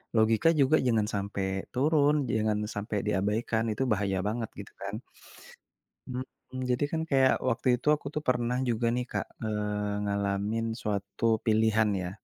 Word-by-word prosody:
logika 110 Hz, +6 st, +4 dB
juga 140 Hz, +3 st, +5 dB
jangan 110 Hz, -3 st, +2 dB
sampai 100 Hz, -1 st, -2 dB, 0.2 s
turun 145 Hz, +1 st, +3 dB
jangan 110 Hz, -1 st, +1 dB, 0.2 s
sampai 105 Hz, +1 st, -3 dB
diabaikan 105 Hz, +4 st, 0 dB
itu 110 Hz, +5 st, -1 dB
bahaya 100 Hz, -2 st, +1 dB
banget 110 Hz, 0 st, -2 dB
gitu 100 Hz, -, -9 dB
kan. 100 Hz, +3 st, -4 dB, 1.1 s
Mhm, 130 Hz, 0 st, -7 dB
jadi 125 Hz, +3 st, +1 dB
kan 160 Hz, -1 st, 0 dB
kayak 135 Hz, -2 st, +4 dB
waktu 125 Hz, +3 st, -1 dB
itu -, -, -9 dB
aku 150 Hz, -, -14 dB
tuh 150 Hz, -, -2 dB
pernah 125 Hz, 0 st, +1 dB
juga 115 Hz, 0 st, 0 dB
nih 125 Hz, -, -1 dB
Kak, -, -, -1 dB, 0.2 s
eee, 105 Hz, -1 st, -2 dB
ngalamin 100 Hz, +2 st, -1 dB, 0.2 s
suatu 100 Hz, +1 st, -3 dB, 0.2 s
pilihan 110 Hz, 0 st, +3 dB
ya. 90 Hz, -, -3 dB
110 Hz, 145 wpm, -29 LUFS, 105-125 Hz, 1.1 s, juga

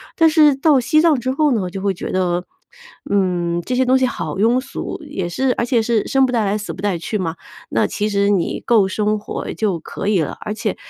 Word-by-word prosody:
但 325 Hz, -1 st, +5 dB
是 305 Hz, -3 st, +5 dB
到 285 Hz, 0 st, +3 dB
西 310 Hz, +5 st, +3 dB
藏 315 Hz, -5 st, +3 dB
之 255 Hz, +2 st, -2 dB
后 300 Hz, +1 st, +2 dB
呢， 200 Hz, -7 st, 0 dB
就 190 Hz, +2 st, -6 dB
会 195 Hz, 0 st, 0 dB
觉 185 Hz, -, -6 dB
得- 180 Hz, -1 st, 0 dB, 0.6 s
嗯， 175 Hz, -3 st, 0 dB
这 250 Hz, -, -4 dB
些 255 Hz, +1 st, +2 dB
东 260 Hz, +1 st, +4 dB
西 260 Hz, -, +2 dB
好 165 Hz, -11 st, -4 dB
庸 230 Hz, +6 st, +3 dB
俗。 255 Hz, -, -6 dB
也 180 Hz, -3 st, -4 dB
是 255 Hz, +8 st, 0 dB
而 235 Hz, -, -1 dB
且 240 Hz, -2 st, +2 dB
是 220 Hz, -1 st, 0 dB
生 270 Hz, 0 st, +3 dB
不 250 Hz, -, -3 dB
带 230 Hz, -2 st, +2 dB
来 205 Hz, +1 st, 0 dB
死 210 Hz, -, -6 dB
不 -, -, -9 dB
带 200 Hz, -3 st, 0 dB
去 170 Hz, +6 st, -3 dB
嘛， 170 Hz, -4 st, -3 dB, 0.3 s
那 -, -, +1 dB
其 210 Hz, 0 st, -2 dB
实 200 Hz, -1 st, +1 dB
你 195 Hz, -5 st, 0 dB
够 225 Hz, -5 st, +4 dB
生 210 Hz, +2 st, 0 dB
活 210 Hz, -, -5 dB
就 200 Hz, -6 st, -1 dB
可 195 Hz, +5 st, -5 dB
以 205 Hz, -3 st, +2 dB
了。 155 Hz, -, -2 dB
而 210 Hz, -, -4 dB
且 215 Hz, -1 st, -3 dB
210 Hz, 260 characters per minute, -19 LUFS, 185-255 Hz, 0.6 s, 但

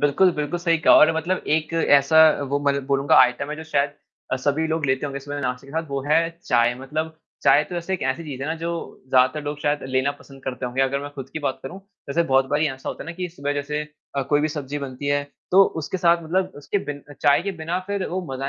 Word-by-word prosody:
बिल्कुल, 145 Hz, +6 st, +4 dB
बिल्कुल, 150 Hz, +3 st, -2 dB
सही 170 Hz, -1 st, +2 dB
कहा 155 Hz, -, +6 dB
और 200 Hz, -, +7 dB
मतलब 175 Hz, +3 st, -1 dB
एक 155 Hz, +1 st, 0 dB
ऐसा 145 Hz, -2 st, +4 dB, 0.3 s
वो 140 Hz, +1 st, +1 dB
मतलब 140 Hz, -1 st, 0 dB
बोलूँगा 140 Hz, 0 st, +2 dB
आइटम 130 Hz, +3 st, +2 dB
है, 150 Hz, -, -4 dB
जो 160 Hz, -, -8 dB
शायद 145 Hz, -2 st, +1 dB, 0.4 s
अ, -, -, +3 dB
सभी 145 Hz, +4 st, 0 dB
लोग 160 Hz, -2 st, -1 dB
लेते 130 Hz, +2 st, 0 dB
होंगे 140 Hz, -1 st, -5 dB
सुबह 145 Hz, +1 st, -5 dB
नाश्ते 125 Hz, 0 st, -3 dB
के 140 Hz, -, -13 dB
साथ, 160 Hz, +1 st, -1 dB
वो 140 Hz, 0 st, -2 dB
है 155 Hz, +2 st, +5 dB, 0.3 s
चाय। 120 Hz, +1 st, +3 dB
मतलब 155 Hz, +5 st, -4 dB, 0.3 s
चाय 145 Hz, -, +5 dB
तो 175 Hz, -, -8 dB
वैसे 175 Hz, +2 st, -3 dB
एक 185 Hz, -, -5 dB
ऐसी 160 Hz, +6 st, -4 dB
चीज़ 135 Hz, -3 st, -6 dB
है -, -, -3 dB
ना, 160 Hz, -, -1 dB
जो 165 Hz, +1 st, -5 dB
ज़्यादातर 130 Hz, +4 st, +3 dB
लोग 145 Hz, 0 st, -4 dB
शायद 145 Hz, 0 st, 0 dB
लेना 130 Hz, +2 st, +1 dB
पसंद 135 Hz, -1 st, -15 dB
करते 130 Hz, -1 st, -3 dB
होंगे, 125 Hz, +2 st, 0 dB
अगर 135 Hz, +1 st, 0 dB
मैं 145 Hz, 0 st, -7 dB
खुद 135 Hz, -2 st, -7 dB
की 155 Hz, -, -4 dB
बात 140 Hz, -3 st, -2 dB
करूँ, 175 Hz, +9 st, -7 dB, 0.3 s
जैसे 165 Hz, +5 st, +2 dB
बहुत 135 Hz, 0 st, +4 dB
बारी 150 Hz, +2 st, +2 dB
ऐसा 135 Hz, -1 st, -7 dB
होता -, -, -5 dB
है -, -, -13 dB
ना 175 Hz, -, -5 dB
कि 180 Hz, -1 st, -3 dB
सुबह 145 Hz, -4 st, -3 dB
जैसे 145 Hz, +1 st, -2 dB, 0.3 s
अ, 140 Hz, -, +1 dB
कोई 145 Hz, +2 st, +1 dB
भी 155 Hz, -, +1 dB
सब्ज़ी 145 Hz, -1 st, -4 dB
बनती 140 Hz, 0 st, -6 dB
है, 145 Hz, 0 st, +1 dB, 0.3 s
तो 195 Hz, +2 st, +7 dB, 0.2 s
उसके 155 Hz, -, -3 dB
साथ 170 Hz, -1 st, +3 dB
मतलब 185 Hz, +3 st, -1 dB
उसके 145 Hz, +7 st, -2 dB
बिन 145 Hz, -1 st, -6 dB
अ, -, -, -8 dB
चाय 145 Hz, +2 st, +3 dB
के 200 Hz, +1 st, -3 dB
बिना 170 Hz, +3 st, -1 dB
फिर 200 Hz, -1 st, -2 dB
वो 185 Hz, +2 st, -2 dB
मज़ा 135 Hz, +1 st, -3 dB
145 Hz, 255 wpm, -23 LUFS, 135-160 Hz, 0.4 s, और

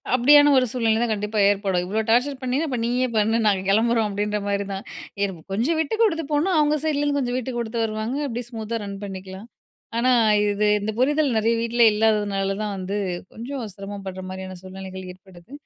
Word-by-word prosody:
அப்டியான 290 Hz, +4 st, +6 dB
ஒரு 255 Hz, -, +4 dB
சூழ்நிலை 230 Hz, -3 st, +1 dB
தான் 235 Hz, -, 0 dB
கண்டிப்பா 210 Hz, +1 st, -2 dB
ஏற்படும். 195 Hz, -3 st, 0 dB
இவ்ளோ 210 Hz, +4 st, -1 dB
டார்ச்சர் 250 Hz, +5 st, +3 dB
பண்ணினா 260 Hz, +5 st, 0 dB
அப்ப 260 Hz, -4 st, -2 dB
நீயே 250 Hz, +2 st, +1 dB
பண்ணு 220 Hz, +1 st, +2 dB
நாங்க 195 Hz, -3 st, +3 dB
கெளம்புறோம், 225 Hz, +2 st, +3 dB
அப்டின்ற 210 Hz, +1 st, -1 dB
மாரி 200 Hz, 0 st, -1 dB
தான். 195 Hz, +1 st, -5 dB, 0.4 s
எனக்கு, 190 Hz, -5 st, -3 dB
கொஞ்சம் 255 Hz, +11 st, +1 dB
விட்டு 320 Hz, +7 st, -1 dB
கொடுத்து 335 Hz, -8 st, +2 dB
போனா 300 Hz, +6 st, +2 dB
அவங்க 300 Hz, 0 st, +3 dB
சைட்லருந்து 290 Hz, -2 st, 0 dB
கொஞ்சம் 250 Hz, -1 st, -1 dB
விட்டுக்குடுத்து 240 Hz, -2 st, -3 dB
வருவாங்க 220 Hz, +4 st, -2 dB
அப்டியே 240 Hz, -1 st, -4 dB
ஸ்மூத்தா 225 Hz, -1 st, -4 dB
ரன் 200 Hz, -1 st, -6 dB
பண்ணிக்கலாம். 190 Hz, +1 st, -8 dB, 0.5 s
ஆனா 255 Hz, +2 st, +3 dB, 0.3 s
இது 205 Hz, 0 st, +1 dB
இந்த 210 Hz, +2 st, -2 dB
புரிதல் 290 Hz, 0 st, +2 dB
நிறைய 225 Hz, +2 st, +2 dB
வீட்ல 235 Hz, +1 st, 0 dB
இல்லாததுனால 205 Hz, -2 st, +1 dB
தான் 210 Hz, -1 st, -3 dB
வந்து, 190 Hz, +2 st, -3 dB, 0.4 s
கொஞ்சம் 250 Hz, +2 st, -5 dB
சிரமபடுற 195 Hz, -2 st, -7 dB
மாரியான 185 Hz, 0 st, -7 dB
சூழ்நிலைகள் 190 Hz, 0 st, -8 dB
ஏற்படுது. 185 Hz, +2 st, -18 dB
220 Hz, 170 wpm, -23 LUFS, 200-255 Hz, 0.5 s, அப்டியான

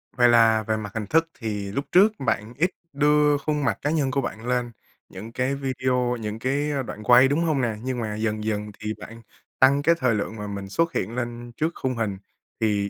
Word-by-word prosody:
Vậy 120 Hz, 0 st, +5 dB
là 115 Hz, -2 st, +5 dB
về 110 Hz, 0 st, +1 dB
mặt 105 Hz, -2 st, -6 dB
hình 110 Hz, -1 st, -2 dB
thức 165 Hz, +7 st, +2 dB
thì 105 Hz, -4 st, -4 dB
lúc 140 Hz, +7 st, -2 dB
trước 205 Hz, +4 st, +6 dB
bạn 110 Hz, -3 st, -1 dB
ít 175 Hz, +5 st, +2 dB, 0.2 s
đưa 150 Hz, 0 st, +3 dB
khuôn 150 Hz, +1 st, -2 dB
mặt 110 Hz, -8 st, +1 dB
cá 145 Hz, -, 0 dB
nhân 145 Hz, -4 st, +1 dB
của 140 Hz, +1 st, +1 dB
bạn 115 Hz, -2 st, -6 dB
lên 125 Hz, -1 st, 0 dB, 0.4 s
những 105 Hz, +5 st, -9 dB
cái 130 Hz, +3 st, -1 dB
video, 130 Hz, -2 st, -1 dB
những 110 Hz, 0 st, -5 dB
cái 140 Hz, +5 st, 0 dB, 0.2 s
đoạn 105 Hz, -, -7 dB
quay, 125 Hz, +3 st, +7 dB
đúng 150 Hz, +5 st, +1 dB
hông 155 Hz, -5 st, +1 dB
nè? 115 Hz, -3 st, 0 dB
Nhưng 130 Hz, -1 st, -2 dB
mà 110 Hz, -2 st, -3 dB
dần 110 Hz, 0 st, -2 dB
dần 105 Hz, -1 st, -2 dB
thì 110 Hz, 0 st, -3 dB
bạn 115 Hz, +1 st, -10 dB, 0.4 s
tăng 140 Hz, +2 st, +5 dB
cái 170 Hz, +3 st, +4 dB
thời 125 Hz, -4 st, +2 dB
lượng 105 Hz, +1 st, -3 dB
mà 105 Hz, -1 st, -6 dB
mình 100 Hz, -1 st, -6 dB
xuất 165 Hz, +9 st, 0 dB
hiện 115 Hz, -, -2 dB
lên 120 Hz, -1 st, -5 dB
trước 160 Hz, +2 st, 0 dB
khung 130 Hz, -1 st, -1 dB
hình. 110 Hz, -4 st, -2 dB, 0.4 s
Thì 105 Hz, -2 st, +1 dB
120 Hz, 225 wpm, -24 LUFS, 110-140 Hz, 0.4 s, quay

